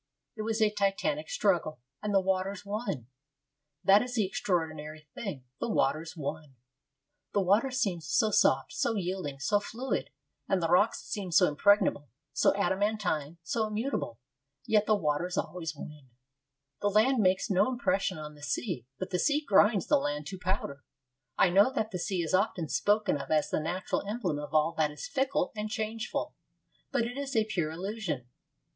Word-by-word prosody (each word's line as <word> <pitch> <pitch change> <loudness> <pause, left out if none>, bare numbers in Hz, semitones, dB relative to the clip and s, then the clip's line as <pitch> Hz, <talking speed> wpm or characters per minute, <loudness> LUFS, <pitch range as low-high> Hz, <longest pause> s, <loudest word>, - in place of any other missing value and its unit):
It 215 - -5
was 220 0 +1
a 210 - +3
titanic 210 - 0
struggle, 175 - +1 0.2
and 210 - -2
the 195 - +5
waters 190 +1 -1
won. 200 - -3 0.8
That 200 +1 +7
is 250 0 -4
the 215 -4 +2
extraordinary 155 -5 -2
thing 185 - -5 0.2
the - - -2
waters 165 -2 0
won. 150 -1 -5 0.8
The 205 - +3
water 205 +8 +3
seems 195 -11 -1
so 215 +7 +2
soft, 135 -8 +3
so 230 - 0
yielding, 180 -7 -3
so 205 +9 +2
fluid, 240 +5 -3 0.4
and 195 - +3
the 165 -2 0
rocks 180 +5 +3
seem 195 -4 -4
so 160 - +6
impregnable, 150 - +3 0.2
so - - +4
adamantine, 195 -6 0
so 220 +6 0
immutable. 215 - -2 0.5
Yet 210 -1 +3
the 215 - +5
waters 175 0 -1
always 165 -3 -3
win. 145 -2 -10 0.7
The 205 - +2
land 225 +5 +3
makes 190 +1 +2
no 195 +5 +3
impression 195 -7 0
on 150 -1 -7
the 145 - -16
sea; 145 - -3
but 185 0 -5
the 180 - 0
sea 295 +5 +2
grinds 205 0 +5
the 295 - +4
land 150 - -2
to 190 - -7
powder. 180 -7 -2 0.5
I 180 - +4
know 200 +7 +5
that 220 -4 -1
the 180 - -3
sea 185 -1 -1
is 160 - -3
often 185 -5 +1
spoken 205 -8 +2
of 135 - -9
as 155 -1 +2
the - - +1
natural 175 +4 -2
emblem 200 -9 -2
of 150 0 -7
all 155 +1 +3
that 155 -1 +3
is 150 - -7
fickle 270 -8 0
and 210 0 -3
changeful; 220 +2 -3 0.6
but 275 -4 +2
it 245 +4 -4
is 275 -2 -4
a 220 -1 +3
pure 175 -8 -1
illusion. 175 - -4
195 Hz, 175 wpm, -30 LUFS, 155-215 Hz, 0.8 s, That